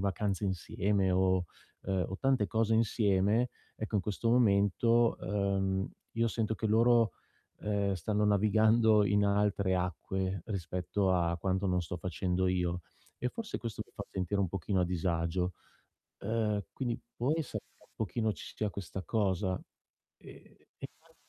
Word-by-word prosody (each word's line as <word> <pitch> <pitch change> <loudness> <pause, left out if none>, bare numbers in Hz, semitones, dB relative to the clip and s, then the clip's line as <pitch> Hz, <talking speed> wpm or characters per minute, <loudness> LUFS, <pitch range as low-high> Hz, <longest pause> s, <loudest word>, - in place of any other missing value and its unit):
vacanze 100 +1 -1
insieme 95 +1 0
o, 95 0 +2 0.4
ehm, 95 -1 -1
tante 135 -6 +2
cose 115 0 +1
insieme, 110 +1 +2 0.3
ecco 110 0 -6
in - - +3
questo 105 +4 -2
momento, 115 +1 +4
uhm, 95 -1 0 0.2
io 115 0 +1
sento 110 -1 -1
che 110 - -2
loro, 115 0 +4 0.5
ehm, 100 -2 0
stanno 105 +4 0
navigando 110 +1 +4
in 100 0 +3
altre 100 -1 +2
acque, 95 +1 -2
rispetto 95 0 -1
a 85 -1 +1
quanto 95 +2 0
non 90 -1 +2
sto 90 +1 -5
facendo 95 +1 -1
io. 90 -1 0 0.4
E 125 - -1
forse 225 - -5
questo 115 -2 -5
mi - - -27
fa - - -6
sentire 95 +2 -2
un 95 - +1
pochino 95 +1 -1
a 90 - +3
disagio. 90 0 -1 0.7
Ehm, 105 -1 0
quindi 120 -3 -2 0.2
può 125 +5 0
essere 160 -2 -4
che - - -28
un - - -29
pochino 110 +1 -1
ci - - -10
sia 105 -2 -1
questa 95 0 -6
cosa? 95 -1 0 0.6
E - - -13
e - - -23 0.3
poi - - -26
100 Hz, 150 wpm, -32 LUFS, 95-110 Hz, 0.7 s, momento